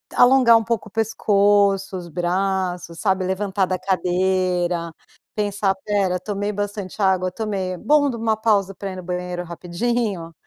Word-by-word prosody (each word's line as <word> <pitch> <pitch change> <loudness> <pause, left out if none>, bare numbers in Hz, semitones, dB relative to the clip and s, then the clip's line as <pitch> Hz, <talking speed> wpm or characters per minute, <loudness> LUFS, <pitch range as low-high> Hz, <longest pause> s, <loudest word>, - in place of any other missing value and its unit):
alongar 245 -2 +6
um 225 - 0
pouco 225 -1 -2
o - - -36
pescoço, 205 -3 +2
os 175 -1 -7
braços, 180 0 -2
sabe? 190 -2 +1
Levantar 190 +1 0
da 185 0 -2
cadeira, 180 -2 0 0.4
pensar: 205 -2 0
"Espera, 190 -2 0
tomei 205 +2 -3
bastante 205 -1 -5
água? 185 -2 +2
tomei. 195 -4 -3
Bom, 290 +6 +3
dou 235 -3 -4
uma 220 -1 +1
pausa 200 -3 +1
para 195 +1 -5
ir - - -8
no 185 - -7
banheiro 180 0 -4
rapidinho." 180 +1 -3
195 Hz, 150 wpm, -22 LUFS, 180-210 Hz, 0.4 s, alongar